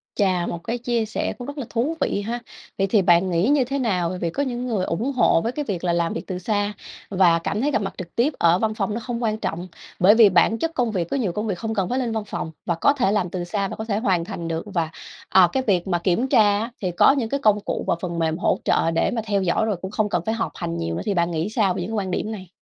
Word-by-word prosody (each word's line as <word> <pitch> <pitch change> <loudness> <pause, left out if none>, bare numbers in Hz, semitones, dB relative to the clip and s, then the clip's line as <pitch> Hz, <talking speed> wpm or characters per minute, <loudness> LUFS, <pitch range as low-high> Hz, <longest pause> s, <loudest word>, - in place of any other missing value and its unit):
Chà, 185 -4 +1
một 170 - -3
cái 235 +2 -2
chia 235 -2 -1
sẻ 220 - -3
cũng 245 - -7
rất 285 +1 -7
là 275 - -4
thú 255 +8 -1
vị 205 - 0
ha. 230 +4 -3 0.4
Vậy 195 - +1
thì 200 +1 +3
bạn 175 +1 +4
nghĩ 175 +3 +1
như 290 -2 +4
thế 275 +3 -2
nào? 185 -9 0
Bởi 180 +1 -5
vì 170 - -1
có 280 +12 -1
những 250 -2 -3
người 210 -6 0
ủng 225 +12 -1
hộ 245 -10 +3
với 230 - -1
cái 295 +3 -4
việc 190 -7 -3
là 175 -1 +1
làm 170 -1 0
việc 165 - -6
từ 180 -1 -4
xa 205 +2 -1 0.4
và 185 -4 +4
cảm 205 +5 -2
thấy 290 +3 +1
gặp 220 - +1
mặt 195 - -3
trực 175 -2 -8
tiếp 265 +6 +2
ở 170 +1 +4
văn 220 +1 0
phòng 210 -1 -2
nó 225 - -2
không 240 0 -4
quan 215 -1 0
trọng 175 -4 -4 0.3
bởi 195 +4 +6
vì 225 -3 +7
bản 190 +5 +3
chất 330 +8 -1
công 245 -6 0
việc 175 -5 -2
có - - -1
nhiều 220 -9 0
công 210 +5 -3
việc 195 -4 -2
không 225 +4 -3
cần 195 -4 -1
phải 255 - 0
lên 245 -3 -1
văn 220 -1 -2
phòng 165 -5 -5
và 170 - 0
có 225 +12 +3
thể 250 -9 +1
làm 205 -4 0
từ 180 0 -4
xa 195 +3 -2
và - - -6
có 220 - -5
thể 205 -3 -1
hoàn 190 -7 +1
thành 170 -4 -5
được 165 0 -2
và, 165 -4 0 0.4
ờ, 185 -2 +6
cái 265 - +1
việc 185 -3 +2
mà 175 -2 +1
kiểm 185 +9 +1
tra 210 -6 +4
á 230 +3 -4
thì 185 -3 -1
có 175 - +5
những 265 -5 -1
cái 280 - -1
công 215 -5 +3
cụ - - -3
và - - +2
phần 175 -2 -3
mềm 160 -1 0
hỗ - - +1
trợ 165 - +2
để 165 - +1
mà 235 - -1
theo 200 -2 +1
dõi 190 +4 +1
rồi, 215 -2 0
cũng 190 - -5
không 215 0 0
cần 175 - 0
phải 220 - 0
họp 230 - -2
hành 85 - -4
nhiều 85 0 -2
nữa, - - -3
thì 205 - 0
bạn 170 -1 +1
nghĩ 165 +3 -1
sao 215 -4 +1
về 185 - -4
những 180 +5 -4
cái - - -2
quan 185 - -4
điểm 210 +4 -2
này? 190 -5 -8
205 Hz, 310 wpm, -23 LUFS, 175-230 Hz, 0.4 s, vì